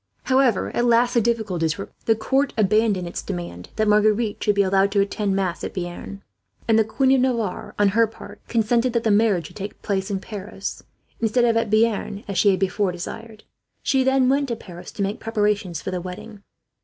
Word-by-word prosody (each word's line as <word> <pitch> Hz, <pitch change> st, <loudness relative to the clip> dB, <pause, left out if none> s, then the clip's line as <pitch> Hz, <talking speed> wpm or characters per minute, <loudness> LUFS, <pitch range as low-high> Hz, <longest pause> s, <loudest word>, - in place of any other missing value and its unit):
However, 260 Hz, -6 st, +2 dB
at 240 Hz, -, +2 dB
last 240 Hz, +1 st, +3 dB
the 235 Hz, -, +3 dB
difficulties 200 Hz, -9 st, 0 dB
were 195 Hz, -, -4 dB
removed. -, -, -31 dB
The 225 Hz, -, +5 dB
court 270 Hz, +5 st, 0 dB
abandoned 210 Hz, -3 st, +2 dB
its 170 Hz, -, -5 dB
demand 85 Hz, 0 st, -6 dB
that 215 Hz, 0 st, +1 dB
Marguerite 210 Hz, +1 st, +2 dB
should 210 Hz, -, +2 dB
be 200 Hz, -, +4 dB
allowed 195 Hz, +1 st, +2 dB
to 205 Hz, -, +3 dB
attend 200 Hz, 0 st, 0 dB
mass 185 Hz, -3 st, -2 dB
at -, -, -5 dB
Bearn; 180 Hz, +2 st, -6 dB, 0.4 s
and 225 Hz, -1 st, +4 dB
the -, -, +5 dB
Queen 260 Hz, +5 st, +1 dB
of 265 Hz, -1 st, +4 dB
Navarre, 235 Hz, -7 st, -1 dB
on 205 Hz, -1 st, +4 dB
her 225 Hz, +3 st, +3 dB
part, 225 Hz, -, -12 dB
consented 235 Hz, +2 st, +1 dB
that 235 Hz, -1 st, 0 dB
the 220 Hz, -, +2 dB
marriage 205 Hz, -5 st, +3 dB
should -, -, -12 dB
take 200 Hz, 0 st, -7 dB
place 195 Hz, -1 st, -1 dB
at 195 Hz, -2 st, -1 dB
Paris, 200 Hz, -1 st, -6 dB, 0.4 s
instead 230 Hz, +2 st, +2 dB
of 230 Hz, -1 st, +2 dB
at 230 Hz, -1 st, +1 dB
Bearn 215 Hz, -2 st, +1 dB
as 200 Hz, -2 st, -1 dB
she 205 Hz, -, +5 dB
had 190 Hz, -2 st, +2 dB
before 195 Hz, 0 st, 0 dB
desired. 215 Hz, +5 st, -8 dB, 0.4 s
She 265 Hz, -1 st, +2 dB
then 265 Hz, -1 st, +3 dB
went 280 Hz, +2 st, +2 dB
to 235 Hz, -, -2 dB
Paris 180 Hz, -5 st, -11 dB
to 200 Hz, -, -2 dB
make 200 Hz, +3 st, -2 dB
preparations 210 Hz, -6 st, -1 dB
for -, -, -3 dB
the 180 Hz, -1 st, -3 dB
wedding. 190 Hz, +4 st, -9 dB
210 Hz, 210 wpm, -23 LUFS, 195-230 Hz, 0.4 s, The